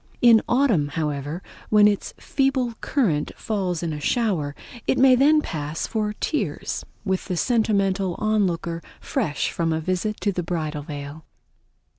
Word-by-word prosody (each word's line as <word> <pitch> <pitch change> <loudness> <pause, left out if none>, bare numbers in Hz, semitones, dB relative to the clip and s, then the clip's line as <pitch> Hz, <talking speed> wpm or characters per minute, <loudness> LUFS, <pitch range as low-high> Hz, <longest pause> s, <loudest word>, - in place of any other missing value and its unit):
In 235 -2 +7
autumn, 240 - +3
however 150 +2 -3 0.3
when 210 -1 +6
its 205 -1 -1
feeble 270 -3 0
current 180 - +1
falls 185 -6 -2
in 165 -2 -2
a 150 - -4
shower, 165 -7 0 0.3
it - - +2
may 265 0 +7
then 295 +4 +5
pass 150 0 -3
for 210 -2 -1
tears 305 +8 -2 0.2
with 190 -2 -1
the 180 -3 -3
sentimental 195 -5 +1
onlooker 180 -6 0 0.2
fresh 145 -2 -1
from 165 -1 -1
a 160 - 0
visit 185 +6 -2
to 205 - +1
the 180 - -2
Bridal 160 -4 -3
Veil. 145 +1 -7
185 Hz, 145 wpm, -24 LUFS, 160-220 Hz, 0.3 s, In